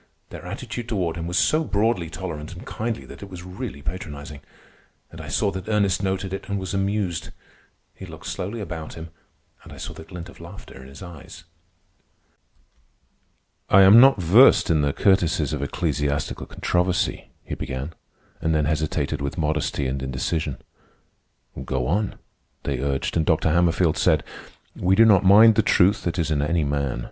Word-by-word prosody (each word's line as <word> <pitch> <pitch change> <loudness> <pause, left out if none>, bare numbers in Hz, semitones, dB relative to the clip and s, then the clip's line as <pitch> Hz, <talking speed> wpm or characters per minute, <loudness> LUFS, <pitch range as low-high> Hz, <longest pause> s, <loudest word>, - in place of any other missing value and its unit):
Their - - -9
attitude 120 -1 -6
toward 90 -7 -1
him 85 0 -5
was 90 +1 -1
so 155 - +3
broadly 105 - 0
tolerant 80 -2 -6
and 90 - -11
kindly 115 +1 -4
that - - -12
it 100 - -9
was 90 -2 -9
really 90 - -7
patronizing. 75 -4 -7 0.7
And - - -9
I - - -9
saw 100 - 0
that 95 +2 -7
Ernest 100 -4 +1
noted 95 -1 -2
it 95 - -6
and 100 - -1
was 95 -1 -5
amused. 95 -4 -1 0.6
He - - -11
looked - - -11
slowly 105 +5 -4
about 85 -5 -6
him, 80 0 -9 0.5
and - - -13
I - - -11
saw - - -7
the - - -10
glint 85 +1 -9
of 85 - -15
laughter 85 -5 -11
in 65 - -12
his 70 +6 -12
eyes. 85 -1 -11 2.3
"I 95 0 +7
am 100 +4 +9
not 135 -3 +7
versed 95 +5 +6
in 80 -2 +3
the 70 -1 +1
courtesies 85 -5 +2
of 75 - -3
ecclesiastical 70 -2 -2
controversy," 90 +1 -1
he - - -7
began, 65 +5 -5 0.5
and 80 -1 +1
then 75 -1 +2
hesitated 75 -1 -1
with 70 +5 -4
modesty 75 -3 -1
and 65 +1 -2
indecision. 65 +3 -2 1.1
"Go 65 -1 -2
on," 100 +8 0 0.5
they 70 -3 -2
urged, 70 0 -2
and 80 - +2
Dr. 80 +1 +2
Hammerfield 85 0 +2
said: - - +3 0.5
"We 95 +2 +2
do 115 +3 +6
not 100 -4 +5
mind 105 +4 +8
the 110 - +3
truth 100 -1 +3
that 85 0 -1
is 80 -3 -1
in 75 -2 +1
any 80 +2 +1
man. 70 -3 -1
85 Hz, 175 wpm, -23 LUFS, 75-95 Hz, 2.3 s, am